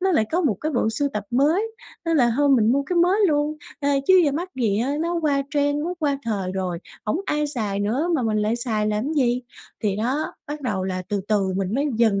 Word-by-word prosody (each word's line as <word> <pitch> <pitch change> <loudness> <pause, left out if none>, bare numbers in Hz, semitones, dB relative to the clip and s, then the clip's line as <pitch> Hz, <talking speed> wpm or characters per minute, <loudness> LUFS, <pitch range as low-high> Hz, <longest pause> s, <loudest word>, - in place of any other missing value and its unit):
nó 385 +1 +2
lại 220 - +3
có 350 - +2
một 285 - +2
cái 310 +1 -2
bộ 240 -3 +1
sưu 285 +6 0
tập 210 -1 -3
mới 295 - +3 0.4
nên 330 -1 +1
là 240 -4 +4
thôi 290 0 +3
mình 235 -4 +4
mua 280 +2 +2
cái 350 +5 -3
mới 355 +3 +4
luôn, 295 +1 +1 0.2
ờ, 285 - 0 0.2
chứ 375 -1 +7
giờ 285 - +2
mắc 340 +6 -3
gì 220 -5 +1
á, 255 +5 0
nó 340 +1 0
qua 280 -2 +2
trend, 290 0 +2
nó 355 - -2
qua 285 -4 0
thời 200 -6 -2
rồi, 185 -3 -2 0.3
hổng 215 - 0
ai 300 -2 0
xài 215 -8 -2
nữa 245 +11 0
mà 300 - +1
mình 220 -2 +1
lại 215 +2 +1
xài 220 -3 -1
làm 215 +8 -1
gì. 250 -4 +1 0.4
Thì 205 -2 0
đó, 260 +8 -1
bắt 295 +1 -5
đầu 205 -8 -2
là 185 -1 -2
từ 205 -1 -1
từ 195 -3 +1
mình 195 +2 -1
mới 280 +3 +1
dần 220 -4 +3
255 Hz, 245 wpm, -23 LUFS, 210-300 Hz, 0.4 s, chứ